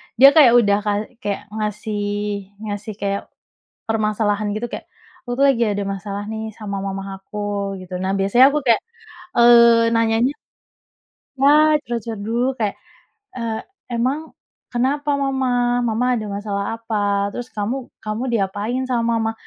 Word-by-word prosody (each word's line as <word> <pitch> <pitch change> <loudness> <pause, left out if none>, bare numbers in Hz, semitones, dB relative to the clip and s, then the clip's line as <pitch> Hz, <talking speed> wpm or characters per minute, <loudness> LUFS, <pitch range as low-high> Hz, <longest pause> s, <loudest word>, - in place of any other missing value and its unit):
dia 275 +4 +8
kayak 285 -7 +7
udah 205 -4 +5
kay 205 0 -1 0.2
kayak 205 -4 -3
ngasih 210 0 -3 0.6
ngasih 205 0 -5
kayak 200 0 -2 0.6
permasalahan, 215 -1 0
gitu. 220 - -3
Kayak, - - -7 0.4
"Aku, 245 - -2
tuh, 275 - +3
lagi 270 -4 +3
ada 205 -1 -1
masalah, 200 +1 -4
nih, 220 +1 -5
sama 200 -3 -5
mama 195 0 -5
aku," 200 -1 -4
gitu. 180 0 -6
Nah, 190 +1 -1
biasanya 200 +7 +5
aku 290 0 -1
kayak, 235 -3 +4 0.6
eee, 235 -1 +7
nanyanya 230 +2 +2 1.1
nah, 300 +3 +6
curhat-curhat 230 -4 -4
dulu, 240 +5 0
kayak, 215 -5 -2 0.6
"Eee, 230 -2 -3 0.3
emang 270 +7 -1 0.4
kenapa 280 +4 0
mama? 250 -3 +1
Mama 230 +3 0
ada 215 - -5
masalah 200 0 -3
apa? 205 -3 0
Terus 245 0 -5
kamu 240 +5 -3
kamu 215 +3 -3
diapain 210 +4 -1
sama 235 -2 +1
mama?" 225 0 0
220 Hz, 140 wpm, -21 LUFS, 205-245 Hz, 1.1 s, dia